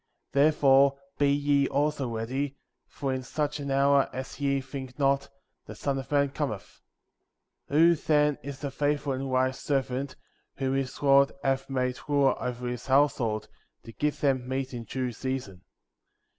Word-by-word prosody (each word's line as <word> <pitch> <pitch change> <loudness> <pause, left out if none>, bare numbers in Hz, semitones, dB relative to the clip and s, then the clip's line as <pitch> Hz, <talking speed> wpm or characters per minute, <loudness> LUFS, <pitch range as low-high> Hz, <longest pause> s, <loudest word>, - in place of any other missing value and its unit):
48. 140 +1 +5
Therefore 140 -2 +5 0.2
be 145 -1 +4
ye 140 -1 +2
also 145 -2 0
ready, 130 +5 -3 0.3
for 135 -2 -3
in 130 - -2
such 150 +3 -2
an 140 -1 -4
hour 140 0 +3
as 130 +2 -7
ye 140 -1 +1
think 130 -1 -8
not, 140 -1 +1 0.4
the - - -8
Son 140 -1 -2
of 135 - -9
Man 140 -1 +3
cometh. 135 -8 -5 0.9
49. 155 +4 +5
Who, - - +5
then, 150 -2 +2
is 140 +1 -8
a 140 - -2
faithful 145 0 0
and 135 +1 -3
wise 130 0 +1
servant^ 135 -1 -2 0.4
whom 135 -1 -1
his 135 +1 -3
lord 140 0 +5
hath 135 0 0
made 125 -1 -1
ruler 140 -2 +3
over 125 -1 -3
his 125 +1 -5
household, 130 -6 +2 0.4
to 115 - -10
give 150 +5 -2
them 130 -3 +1
meat 130 0 -2
in 120 -1 -6
due 130 0 -3
season? 120 -6 -5
135 Hz, 165 wpm, -28 LUFS, 130-140 Hz, 0.9 s, 48